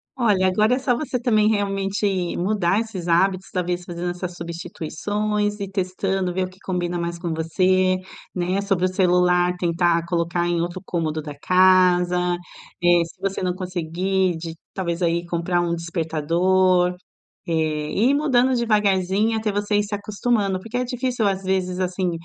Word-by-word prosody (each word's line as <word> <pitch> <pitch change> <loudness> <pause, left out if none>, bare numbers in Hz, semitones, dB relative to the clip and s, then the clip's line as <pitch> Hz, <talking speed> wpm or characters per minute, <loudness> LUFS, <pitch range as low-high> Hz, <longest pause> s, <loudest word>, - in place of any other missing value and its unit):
Olha, 210 -7 +2
agora 215 +6 +3
é 260 - -2
só 250 -2 +1
você 260 -2 -2
também 215 -3 +3
realmente 200 -1 -1 0.3
mudar 195 +1 +1
esses 200 -6 -5
hábitos, 185 +2 +2
talvez 180 -1 -2
fazendo 175 0 -4
essas 180 0 -5
substituições, 205 +5 -3
ir 200 - -4
testando, 190 -1 -1
ver 185 +1 0
o - - -8
que 185 +1 -20
combina 175 -1 -2
mais 170 0 -3
com 170 -2 -3
você, 185 +3 +2 0.4
né. 180 +2 0
Sobre 195 -2 +1
o - - +1
celular, 180 -1 +3
tentar 170 -1 +1
colocar 170 0 0
em 175 -1 0
outro 175 +2 -4
cômodo 160 -2 -2
da 150 -1 -7
casa, 180 0 +4 0.7
eh, 175 -1 +5
se 170 +3 -15
você 195 0 -2
não 180 - 0
conseguir 185 0 -1
de 165 0 -7 0.2
talvez, 175 -2 -3
aí, 170 0 +1
comprar 170 +1 0
um 170 -1 0
despertador, 175 +2 +1 0.5
eh, 170 - -3 0.4
e 230 +6 +2
ir - - +2
mudando 260 -3 +3
devagarzinho 210 -1 +2
até 215 -1 -1
você 205 +1 -1
ir 205 - +2
se 205 0 -7
acostumando, 205 -2 -1
porque 225 +5 -5
é 250 - +1
difícil, 250 -3 -1
às 195 -1 -1
vezes 185 -1 -1
assim, 180 0 -1
185 Hz, 165 wpm, -22 LUFS, 175-205 Hz, 0.7 s, eh